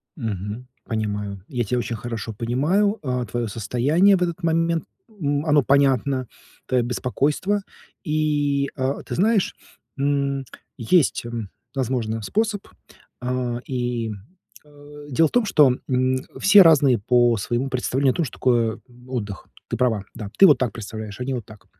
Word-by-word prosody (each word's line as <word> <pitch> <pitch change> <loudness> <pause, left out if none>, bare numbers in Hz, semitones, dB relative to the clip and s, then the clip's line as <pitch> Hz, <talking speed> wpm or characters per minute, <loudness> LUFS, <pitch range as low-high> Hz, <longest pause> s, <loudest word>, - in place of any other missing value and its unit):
Мгм. 110 - -5 0.2
Понимаю, 105 -3 -3
я 125 -2 -2
тя 125 +4 -1
очень 115 -1 -2
хорошо 115 -1 -5
понимаю, 150 - +1
э, 125 -2 -1
твоё 120 +1 -2
состояние 130 - +2
в 180 - -2
этот 175 0 -3
момент. 165 0 +1 0.2
М, 145 -8 -2
оно 150 -2 +4
понятно, 135 -1 +2 0.4
твоё 125 -2 +1
беспокойство. 145 - 0 0.4
И, 145 -3 0
э, 130 0 0
ты - - -4
знаешь, 210 +2 +2 0.4
м, 140 -1 0 0.3
есть, 130 +3 +2
м, 115 -4 -5 0.3
возможно, 120 -4 -1
способ. 210 - -1 0.6
Э, 125 -1 -2
и, 120 -3 -2 0.5
э, 145 0 -14
дело 160 +4 +3
в - - -11
том, 245 -2 +2
что, 145 -10 +4
м, 130 0 +1 0.2
все 200 +1 +8
разные 145 - +5
по 120 +2 +3
своему 120 +6 -2
представлению 130 +1 +1
о - - -14
том, 170 - 0
что 125 - -8
такое 120 -3 +1 0.3
отдых. 105 -7 -5 0.2
Ты 120 - -2
права, 110 -5 +1
да. 105 -3 -6
Ты 195 - +9
вот 145 -6 +6
так 125 -3 -1
представляешь, 110 -1 -7
они 130 +2 -2
вот 120 -4 -4
так. 110 -3 -15
130 Hz, 150 wpm, -23 LUFS, 115-150 Hz, 0.6 s, Ты